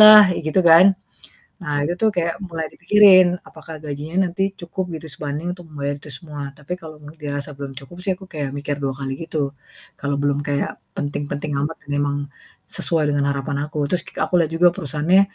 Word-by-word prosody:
lah, 215 -2 +11
kek 180 - -1
gitu 190 - +4
kan. 170 +3 +9 0.8
Nah 150 -3 -2
itu 175 - -1
tuh 220 -1 +4
kayak 170 -1 +1
mulai 165 -3 -4
dipikirin. 185 0 +7 0.2
Apakah 160 0 -10
gajinya 155 +6 -1
nanti 180 +3 -2 0.2
cukup 175 +2 -3
gitu, 160 - -10
sebanding 150 +5 -3
untuk 175 -2 -13
membayar 145 -1 -3
itu 150 - -11
semua. 150 0 -8 0.2
Tapi 150 +5 -4
kalau 155 -1 -10
m 145 - -10
dirasa 145 0 -4
belum 140 -1 -5
cukup 140 +6 -13
sih 190 - +2
aku 190 - -11
kayak 145 -3 -3
mikir 145 0 -2
2 135 - +1
kali 135 -1 -3
gitu. 160 -1 -4 0.6
Kalau 140 0 -1
belum 145 0 +2
kayak 145 -3 0 0.3
penting-penting 145 +1 -3
amat 150 +3 -2
dan 145 - -12
memang 145 0 +1 0.5
sesuai 160 -3 +1
dengan 140 -1 +1
harapan 140 0 -2
aku. 150 - -6
Terus 175 -2 +1
k - - -11
aku - - -5
lihat 160 - -1
juga 175 +2 +6
perusahaannya 155 +6 +3
155 Hz, 195 wpm, -21 LUFS, 145-175 Hz, 0.8 s, lah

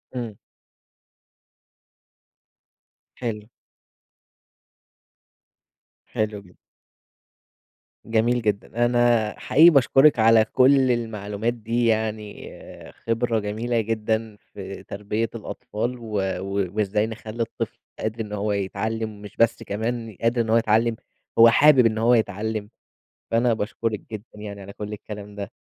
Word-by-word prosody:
إمم. 115 -5 -5 2.8
حلو. 110 -3 -5 2.6
حلو 105 -1 -2
جدًا. 90 -2 -20 1.5
جميل 115 +2 +1
جدًا، 110 +2 0
أنا 120 -3 +2
حقيقي 160 +5 +6
باشكرِك 135 -2 +5
على 110 0 +6
كلّ 130 +1 +4
المعلومات 110 -1 -2
دي 120 +1 -1
يعني 110 -2 -2 0.4
خِبرة 115 0 -1
جميلة 115 +3 -1
جدًا 110 0 -2 0.2
في - - -8
تربية 105 +3 -3
الأطفال، 115 +2 -4
و 115 -2 -9 0.3
و 100 0 -2
وإزاي 105 0 +1
نخلّي 110 0 -6
الطفل 115 - -6 0.2
قادر 110 +1 -3
إن 105 -1 -6
هو 105 0 -1
يتعلّم، 110 +2 -3
مش 105 - -11
بس 115 0 +2
كمان 115 +1 -3
قادر 115 +1 +2
إن 115 - -3
هو 115 - +5
يتعلّم، 115 +1 +2 0.4
هو 115 0 +10
حابب 135 +1 +6
إن 110 -1 +2
هو 115 +2 +4
يتعلّم، 110 -1 -1 0.6
فأنا 115 +1 +3
باشكرِك 110 0 -3
جدًا 105 -1 -6
يعني 100 -1 -7
على 100 0 -9
كلّ 105 +1 -7
الكلام 105 -1 -8
ده. 100 -1 -6
110 Hz, 115 wpm, -24 LUFS, 105-115 Hz, 2.8 s, هو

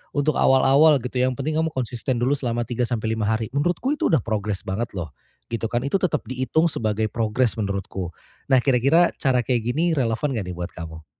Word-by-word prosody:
untuk 145 +1 +1
awal-awal 135 +4 +5
gitu 125 0 -3
yang 130 0 +1
penting 155 +3 -2
kamu 160 0 0
konsisten 125 -1 -2
dulu 130 +3 +2
selama 120 -3 -2
3 120 0 -1
sampai 110 -2 -2
5 110 -1 -1
hari 110 0 0
menurutku 175 - 0
itu - - 0
udah 160 - +4
progres 105 -3 -2
banget 105 +5 -2
loh, 85 -4 -4 0.4
gitu 115 -1 -2
kan 120 +1 -1
Itu 140 +7 +1
tetap 185 - 0
dihitung 130 +6 +1
sebagai 110 -3 -1
progres 115 +1 0
menurutku, 95 -3 -3 0.4
nah 130 - +6
kira-kira 140 +6 +4
cara 130 -3 +2
kayak 125 -3 +1
gini 165 +6 +1
relevan 125 +3 0
enggak 100 -5 -3
nih - - -7
buat 90 0 -5
kamu? 80 -2 -9
125 Hz, 200 wpm, -23 LUFS, 110-140 Hz, 0.4 s, nah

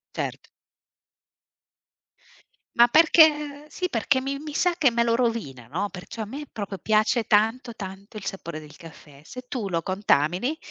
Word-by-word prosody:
Certo. - - -5 2.3
Ma 235 0 +7
perché 300 0 +4
sì, 365 +3 -3
perché 260 0 +1
mi 275 +1 -4
mi 300 0 -8
sa 360 -1 +2
che 300 -7 +4
me 235 0 +1
lo 230 -1 +1
rovina, 225 - -2
no, 185 +9 -2
perciò 180 +5 -7
a - - -6
me 280 +6 -7
proprio 200 -4 -6
piace 215 +3 +2
tanto 225 +3 +2
tanto 195 +2 -9
il 205 - -8
sapore 170 -5 -5
del 150 -1 -13
caffè. 150 -3 -14
Se 250 +9 -9
tu 230 -8 -4
lo 165 -2 -1
contamini, 190 - +1
225 Hz, 155 wpm, -25 LUFS, 185-270 Hz, 2.3 s, Ma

